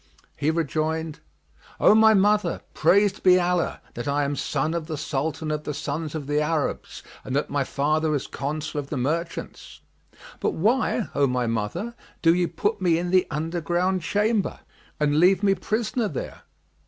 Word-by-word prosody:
He 145 +2 0
rejoined, 160 0 -1 0.6
"O - - +6
my 220 0 +6
mother, 205 -2 +2
praised 200 +5 +3
be 185 -1 +6
Allah, 175 -1 0
that 120 - -6
I 145 +1 +1
am 140 +1 -1
son 155 +3 -1
of 165 -2 -3
the 155 -3 -4
Sultan 155 +2 -2
of 150 0 -2
the 150 - -4
Sons 150 +2 -4
of 150 -3 -4
the 145 +1 +1
Arabs 150 -1 -2 0.2
and 130 - -4
that 145 - -1
my 140 -1 +1
father 155 +3 0
is 140 - -2
Consul 150 +1 -4
of 140 - -5
the 150 - -3
merchants! 165 +7 -4 0.6
But - - -1
why, 225 +4 +1
O 140 0 +3
my 125 -1 0
mother, 115 - -2 0.3
do 165 -1 +6
ye 175 0 +1
put 205 +5 -2
me 170 -3 +3
in 175 +1 -2
the 185 -1 +4
underground 175 +4 -1
chamber 205 +6 0 0.4
and 150 0 +2
leave 185 +4 +4
me 195 -1 +4
prisoner 215 +4 -1
there?" 145 - -6
160 Hz, 170 wpm, -24 LUFS, 145-185 Hz, 0.6 s, O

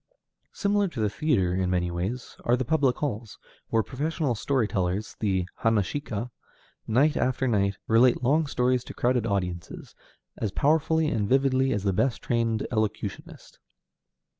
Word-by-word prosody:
Similar 205 -1 +1
to 155 -9 -7
the 105 -2 +1
theatre 105 - +1
in 95 0 0
many 90 -1 0
ways 95 +9 -4
are 120 +1 +2
the 130 - -2
public 135 -2 +2
halls, 115 -6 -4 0.3
where 110 -1 +2
professional 145 +1 -2
story 120 +1 0
tellers, 95 +1 -2
the 95 -4 0
hanashika, 115 +2 -1 0.6
night 140 +7 +3
after 130 +1 0
night, 100 -4 +1
relate 120 +2 +4
long 150 +5 +2
stories 125 -2 +1
to - - -9
crowded 120 -2 +1
audiences, 90 -4 -4 0.4
as 110 - -2
powerfully 160 +5 +2
and 105 -7 -1
vividly 135 0 +3
as 100 - -1
the 100 -2 +1
best 115 +5 +1
trained 115 -2 0
elocutionist. 110 -3 -4
115 Hz, 145 wpm, -26 LUFS, 100-135 Hz, 0.6 s, relate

